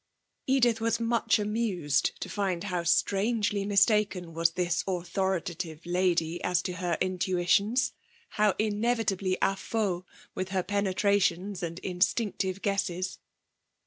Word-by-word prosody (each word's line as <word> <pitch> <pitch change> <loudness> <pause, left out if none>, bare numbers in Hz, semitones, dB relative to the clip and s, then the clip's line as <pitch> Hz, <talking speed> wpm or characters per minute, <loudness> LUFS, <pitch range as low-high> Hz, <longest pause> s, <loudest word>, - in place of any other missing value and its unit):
Edith 245 -4 +3
was 230 +1 +1
much 230 -1 +2
amused 205 -9 0
to - - -3
find 190 -4 -2
how 180 -4 -2
strangely 200 +4 +1
mistaken 200 -3 +2
was 165 0 +2
this 175 -1 0
authoritative 175 -2 -2
lady 175 -2 0
as 180 0 +1
to 185 - -2
her 175 -1 -1
intuitions, 185 +6 +1 0.4
how 210 -2 +2
inevitably 210 -3 0
à 195 - +3
faux 195 -4 -2 0.2
with 185 0 -3
her 190 -1 0
penetrations 200 -1 +1
and 170 -1 -4
her - - -11
instinctive 190 +1 0
guesses. 185 -2 -1
190 Hz, 120 wpm, -28 LUFS, 175-210 Hz, 0.4 s, Edith